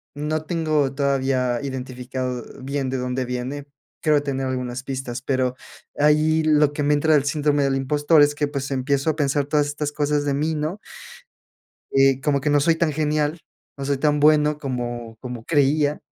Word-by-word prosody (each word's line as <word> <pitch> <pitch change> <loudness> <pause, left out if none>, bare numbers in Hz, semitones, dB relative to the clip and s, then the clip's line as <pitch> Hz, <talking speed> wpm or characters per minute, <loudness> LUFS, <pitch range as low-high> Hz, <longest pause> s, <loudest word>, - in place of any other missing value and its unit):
no 155 +2 -2
tengo 155 -5 0
todavía 135 -3 0
identificado 130 -1 -4 0.2
bien 135 0 -2
de 130 - -2
dónde 125 +1 -2
viene, 125 +4 -5 0.3
creo 150 -2 +3
tener 135 -2 -2
algunas 125 -1 -3
pistas, 130 -2 -5
pero 130 -2 0 0.4
ahí 155 +2 +3
lo 150 -1 +3
que 145 - -2
me 145 +1 +3
entra 155 +2 +3
el 145 - +3
síndrome 145 -1 +1
del 135 -1 +1
impostor 145 +3 +3
es 145 0 +4
que 145 0 0
pues 140 -1 -4
empiezo 140 +3 0
a - - -7
pensar 145 -1 +1
todas 145 +1 +1
estas 145 0 -3
cosas 145 0 0
de 140 - 0
mí, 155 +3 0
¿no? 155 +6 -3 1.1
eh, 135 -1 +4
como 140 0 +1
que 150 +2 0
no 145 0 +4
soy 165 +3 +3
tan 160 -2 +1
genial, 150 +1 0 0.4
no 140 - -5
soy 140 0 0
tan 150 +1 +1
bueno 150 0 +4
como 120 -4 -5
como 125 -3 -7
creía. 145 0 +2
145 Hz, 180 wpm, -22 LUFS, 130-150 Hz, 1.1 s, es